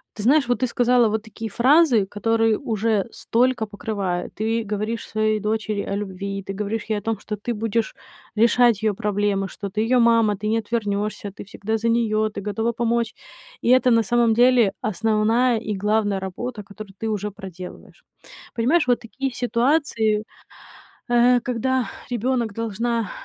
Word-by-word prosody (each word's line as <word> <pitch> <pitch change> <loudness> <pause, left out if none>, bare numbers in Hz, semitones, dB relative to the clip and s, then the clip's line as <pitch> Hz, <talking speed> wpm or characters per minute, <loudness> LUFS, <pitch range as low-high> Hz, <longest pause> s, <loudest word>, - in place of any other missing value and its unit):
ты 215 - -6
знаешь, 270 +3 +4
вот 245 - +1
ты 255 - +1
сказала 245 0 +3
вот 215 0 -2
такие 225 0 -7
фразы, 255 - +4
которые 225 +2 +1
уже 220 -5 0
столько 245 -1 +1
покрывает. 200 -4 -3
Ты 225 +2 -1
говоришь 215 +2 -3
своей 215 0 0
дочери 215 -1 -1
о 200 - -3
любви, 195 0 -4
ты 195 - -5
говоришь 210 +2 -3
ей 215 -2 0
о - - -14
том, 225 +1 -2
что 210 - -5
ты 210 +4 -4
будешь 225 0 -2 0.4
решать 235 -1 +4
её 215 -2 +2
проблемы, 205 -2 -1
что 200 +1 -7
ты 210 +2 -2
её 245 +2 +3
мама, 230 -3 +4
ты 210 +2 -5
не 225 +1 +2
отвернёшься, 210 -2 -2
ты - - -10
всегда 210 +2 -3
за 230 +1 -2
неё, 220 -2 +1
ты 205 -1 -7
готова 225 +3 -1
помочь. 235 -1 0 0.5
И - - +1
это 255 0 +5
на 230 -1 +4
самом 235 +1 +2
деле 240 -3 +4
основная 220 +4 +2
и 215 -1 -4
главная 205 -1 +1
работа, 210 +4 -5
которую 200 0 -11
ты 225 - -1
уже 210 -1 -2
проделываешь. 190 - -11 0.5
Понимаешь, 260 +6 +2
вот 245 - +3
такие 265 +3 -4
ситуации, 235 -4 +1 0.9
э, 245 +1 +5
когда 255 +1 -1 0.2
ребёнок 240 -1 0
должна 230 0 -2
220 Hz, 165 wpm, -22 LUFS, 210-235 Hz, 0.9 s, это